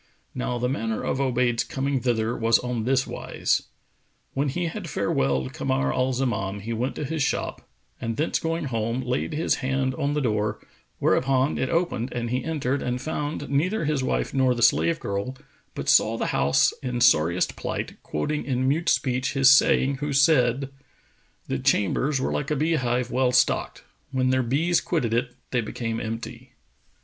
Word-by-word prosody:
Now 125 - -2
the 125 +1 0
manner 115 -4 -2
of - - -1
Obayd's 120 -3 +1
coming 135 0 -1
thither 120 -2 0
was 115 -1 +3
on 125 -3 -3
this 135 +1 +2
wise. - - -2 0.7
When 140 +1 0
he 175 +6 -2
had 175 +4 -4
farewelled 65 - 0
Kamar 70 0 0
al 130 +1 +1
Zaman, 105 -6 -2
he 115 +3 -4
went 125 +4 -2
to 150 - -3
his 160 +2 -3
shop 135 - -2 0.3
and 115 -1 -3
thence 155 - 0
going 165 +1 -2
home, 115 -1 -1
laid 125 +5 -2
his 160 - +1
hand 135 0 -1
on 140 +3 -1
the - - +1
door, 105 -5 0 0.4
whereupon 135 +1 +2
it 130 - 0
opened 165 -8 -1
and 120 -1 -3
he 125 +1 -1
entered 145 -4 -1
and 125 0 -2
found 145 0 -3
neither 165 +8 0
his 145 -3 0
wife - - -1
nor 130 -2 +3
the 120 - -1
slave 160 +7 +3
girl, 100 +6 -3 0.4
but - - -5
saw - - +4
the - - -1
house 70 +2 +3
in 125 -1 -3
sorriest 85 -7 +3
plight, - - -5
quoting 150 - -2
in 130 -1 0
mute 160 +5 +1
speech 130 -1 +1
his 135 -1 +6
saying 135 0 +4
who 145 +1 -3
said,[FN#453] 135 -2 +3 0.8
"The - - -2
chambers 135 +8 +1
were - - -1
like 140 - -2
a 150 - +1
bee 155 +4 +1
hive 125 -4 0
well 130 -1 +2
stocked: 125 0 +1
* - - -41
When 130 -1 +1
their 130 0 +2
bees 150 +8 +1
quitted 130 -10 -1
it, 120 +1 -1 0.2
they 125 - +1
became 115 +1 -4
empty." 115 +3 -6
130 Hz, 180 wpm, -25 LUFS, 115-140 Hz, 0.8 s, his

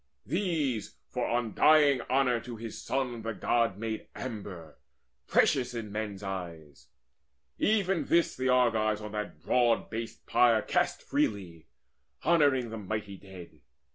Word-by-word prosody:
These, 150 - -1
for - - -2
undying 135 +4 +4
honour 130 -2 +2
to 120 +1 -8
his 115 -1 -7
son, 125 -3 -2
The 115 0 -3
God 115 -4 +1
made 110 0 -4
amber, 100 - -7 0.5
precious 125 -2 +2
in 110 -3 -5
men's 105 -2 -4
eyes. 85 -7 -7 0.7
Even 195 -4 +2
this 170 0 +2
the 130 0 -1
Argives 110 -4 +3
on 105 -1 -7
that 105 0 -5
broad 120 -2 +2
based 115 0 -6
pyre 115 -3 +4
Cast - - 0
freely, 90 -6 -2 0.6
honouring 140 -8 +3
the 115 - -5
mighty 105 0 -4
dead. 95 -2 -13
115 Hz, 130 wpm, -29 LUFS, 105-130 Hz, 0.7 s, undying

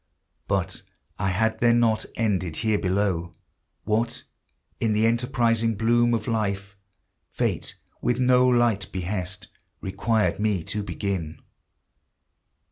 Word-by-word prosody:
But - - -1 0.4
I 95 - +1
had 110 +4 +1
then 120 0 +4
not 110 -2 +2
ended 95 -7 0
here 110 -2 +2
below 90 -3 0 0.5
What, 115 +3 0 0.6
in 110 -2 +1
the 110 +1 +3
enterprising 115 -1 +2
bloom 120 +1 +3
of 110 -2 -4
life, 100 -3 -1 0.5
Fate - - -2 0.3
with 125 - +1
no 125 0 +5
light 120 -5 +2
behest 95 0 -4 0.3
Required 105 +3 0
me 105 -5 +1
to 105 +4 -3
begin. 95 -4 -3
110 Hz, 115 wpm, -25 LUFS, 95-115 Hz, 0.6 s, no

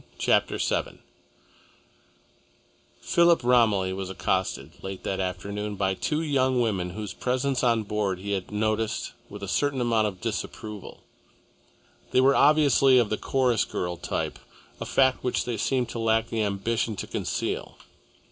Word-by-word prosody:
CHAPTER - - +2
VII - - -1 2.1
Philip 170 -4 +4
Romilly 110 -7 +3
was 95 0 -5
accosted, 95 -6 -2
late 95 -1 -6
that 95 - -2
afternoon, 100 +3 -3
by 95 -1 0
two 150 - -1
young 130 -4 +2
women 100 -7 0
whose 105 -4 -5
presence 130 +4 -1
on 115 -3 +3
board 105 -3 -1
he 100 +2 -6
had 95 -2 -2
noticed 110 +1 -1 0.2
with - - -9
a - - -4
certain 145 -2 0
amount 115 -3 +2
of 95 -3 -6
disapproval. 110 -1 -6 1.1
They - - +3
were 135 +2 +5
obviously 140 -3 +5
of 115 -4 +2
the 110 - +1
chorus 125 -4 +1
girl 90 0 -3
type, 85 - -3 0.4
a - - -5
fact 130 -1 +2
which 125 - 0
they 120 - -2
seemed 125 +3 0
to 115 - -5
lack 115 0 +1
the 115 -1 -1
ambition 110 +2 -1
to - - -5
conceal. - - -3
110 Hz, 145 wpm, -26 LUFS, 100-125 Hz, 2.1 s, were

